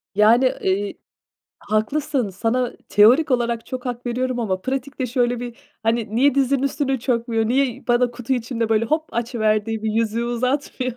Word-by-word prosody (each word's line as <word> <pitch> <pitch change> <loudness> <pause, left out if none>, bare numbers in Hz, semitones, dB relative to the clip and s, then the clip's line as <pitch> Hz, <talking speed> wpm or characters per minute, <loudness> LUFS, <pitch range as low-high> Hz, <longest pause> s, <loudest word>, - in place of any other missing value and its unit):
Yani, 225 +5 +5 0.2
ııı, 200 +2 0 0.7
haklısın, 250 +3 -1
sana 235 +6 -1 0.2
teorik 250 +10 +5
olarak 235 -2 0
çok 255 0 -6
hak 245 0 -5
veriyorum 250 0 -1
ama 190 -4 -1
pratikte 265 +2 -3
şöyle 245 0 0
bir, 240 -1 -6 0.3
hani, 225 -1 0
niye 275 +2 +4
dizinin 275 0 +2
üstüne 275 -1 0
çökmüyor, 230 -2 0
niye 260 -1 0
bana 240 0 +3
kutu 245 +1 -4
içinde 230 -2 -1
böyle 225 0 +2
hop 310 +6 0
açıverdiği 220 -2 0
bir 220 - 0
yüzüğü 230 +1 0
uzatmıyor. 255 +1 -1
240 Hz, 155 wpm, -21 LUFS, 225-255 Hz, 0.7 s, Yani